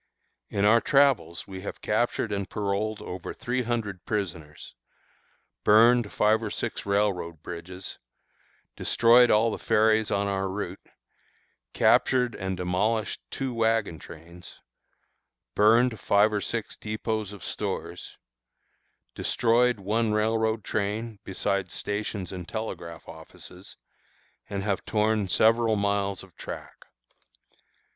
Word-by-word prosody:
In 100 0 0
our 115 +2 +6
travels 135 -11 +2
we 95 -1 -8
have 100 - -6
captured 110 0 0
and 100 -2 -3
paroled 105 +1 -2
over 90 -1 -6
three 125 +1 -2
hundred 110 -6 -3
prisoners, 85 -7 -5 0.9
burned 115 +1 +5
five 110 +1 +3
or 110 - -3
six - - -4
railroad 95 -6 0
bridges, 90 +2 -7 0.8
destroyed 120 +1 +5
all 110 +2 +4
the - - -5
ferries 110 -1 +3
on 100 0 0
our 95 -1 -1
route, 95 -1 -5 0.9
captured 125 -2 +3
and 95 -1 -4
demolished 105 +5 -1
two 135 -2 -3
wagon 110 -7 +1
trains, 85 +2 -12 0.9
burned 115 +2 +4
five 105 +2 +3
or 105 - 0
six 115 0 -3
dépôts 110 -1 -3
of 100 -3 -10
stores, - - -5 1.0
destroyed 120 0 +2
one 105 +3 0
railroad 110 0 +1
train, 105 +1 -3
besides 95 -1 -2
stations 100 -2 -3
and 90 -3 -7
telegraph 85 -7 -6
offices, 90 +3 -11 0.7
and 100 -1 -3
have 100 -2 -1
torn 105 -1 +1
several 115 +4 +3
miles 100 -1 -1
of 95 -3 -17
track. - - -9
105 Hz, 115 wpm, -27 LUFS, 95-110 Hz, 1.0 s, our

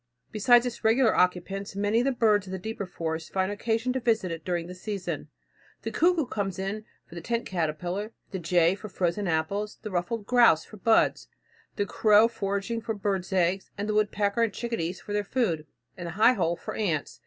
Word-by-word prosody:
Besides 240 +3 +5
its 245 -1 -5
regular 225 +1 +4
occupants, 190 +2 0
many 205 +3 +1
of 245 - +1
the 275 - +3
birds 215 -5 +2
of - - -7
the 190 - -3
deeper 200 0 -5
forest 160 -2 -4
find 190 +1 0
occasion 225 +4 -1
to 260 - -1
visit 225 -7 +1
it 165 -1 -5
during 175 -2 -2
the 180 - -8
season. 195 0 -5 0.6
The - - -3
cuckoo 340 -3 +3
comes 200 -6 -3
for 195 -1 -7
the 170 - -6
tent 235 +6 -2
caterpillar, 180 +4 -2 0.2
the 190 - -3
jay 170 0 +3
for 200 +2 -8
frozen 185 +2 -1
apples, 185 +6 -1
the 215 - -5
ruffed 200 +5 -2
grouse 240 -10 +5
for 215 - -13
buds, 220 +3 +2 0.5
the 205 - 0
crow 215 +1 +5
foraging 200 +1 -3
for 225 0 -3
birds' 195 -2 -2
eggs, 185 +1 +1
the 210 +1 -2
woodpecker 210 0 +1
and 230 -2 +2
chickadees 195 -7 -3
for 205 - -7
their 205 0 +1
food, 195 -9 -1 0.3
and 175 -2 -6
the 170 - -5
high 220 +6 +5
hole 170 -6 0
for - - -7
ants. 170 -9 -2
200 Hz, 195 wpm, -27 LUFS, 180-225 Hz, 0.6 s, Besides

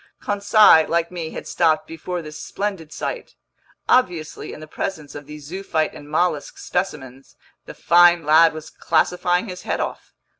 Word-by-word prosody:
Conseil, 205 -5 +5
like 170 0 0
me, 170 -3 -5
had - - -8
stopped 160 -2 +1
before 165 +2 -6
this 155 0 -9
splendid 195 -3 -5
sight. - - -6 0.5
Obviously, 175 -11 0
in - - -9
the 155 - -9
presence 155 -2 -5
of 145 -1 -10
these 150 -1 -10
zoophyte 165 -2 -2
and 145 - -12
mollusk 160 -1 -1
specimens, 135 -8 -5 0.3
the - - -9
fine 175 -1 +5
lad 160 +2 +6
was 155 -1 -10
classifying 180 +3 0
his 180 -2 -8
head - - -3
off. - - -5
165 Hz, 155 wpm, -21 LUFS, 155-180 Hz, 0.5 s, lad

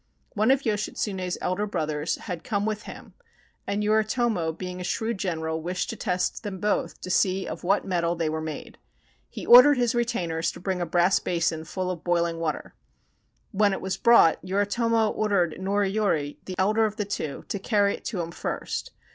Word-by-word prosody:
One 215 +2 +2
of 270 +1 +3
Yoshitsune's 200 -3 -2
elder 200 +4 -1
brothers 155 -4 -1
had 170 -2 -6
come 205 -3 -1
with 215 -1 -3
him, - - -11 0.5
and 205 +1 -1
Yoritomo 215 -4 +1
being 180 +2 -6
a - - -4
shrewd 220 +3 -2
general 160 -4 -2
wished 180 +2 -2
to - - -6
test 180 0 -1
them 200 -4 -6
both 210 +3 -1
to 185 - -5
see 190 0 +2
of - - -6
what 195 +3 +2
mettle 175 -2 0
they 165 -2 -1
were 160 0 -2
made. 155 -1 -7 0.5
He - - -7
ordered 250 +4 +9
his 240 -2 +2
retainers 180 -9 -1
to - - -10
bring 185 0 -2
a 175 - -1
brass 175 +3 +3
basin 165 -2 -1
full 185 +3 -3
of 170 -3 -7
boiling 170 -1 0
water. 160 -2 -3 0.8
When 205 -1 +3
it - - -3
was 190 0 -2
brought, 235 -9 +5
Yoritomo 215 +4 +1
ordered 185 -6 0
Noriyori, 195 -6 0
the 185 - -5
elder 215 +4 +3
of 215 -1 -2
the 210 - -2
two, 155 -8 -4
to 200 - -2
carry 200 0 +2
it - - -9
to 195 -6 -2
him 165 0 -5
first. - - -4
190 Hz, 185 wpm, -26 LUFS, 170-210 Hz, 0.8 s, ordered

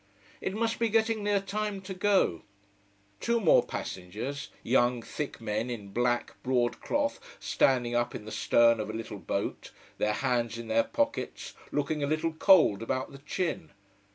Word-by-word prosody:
It 190 - -2
must 225 +1 0
be 230 -1 +2
getting 220 0 +2
near 205 -1 +2
time 205 +1 -3
to 190 0 -6
go. 185 - +2 0.8
Two 235 0 +1
more 190 -8 +5
passengers 110 +11 -5
young 120 -1 +2
thick 150 +4 -5
men 110 +1 -2
in 105 -5 -6
black 120 +3 0
broad 125 -2 0
cloth 285 0 0 0.2
standing 120 -3 +2
up 120 0 0
in 105 - -7
the 110 - -7
stern 115 +3 +4
of 110 - -3
a - - -4
little 110 -2 -6
boat, 100 - -3 0.3
their 105 - +2
hands 120 -1 0
in 115 -1 -7
their 115 +1 +3
pockets, 290 0 -2 0.2
looking 145 +1 -1
a - - +1
little 155 +2 0
cold 160 - +5
about 130 +3 -2
the 140 - -11
chin. 165 +4 -3
130 Hz, 165 wpm, -29 LUFS, -, 0.8 s, more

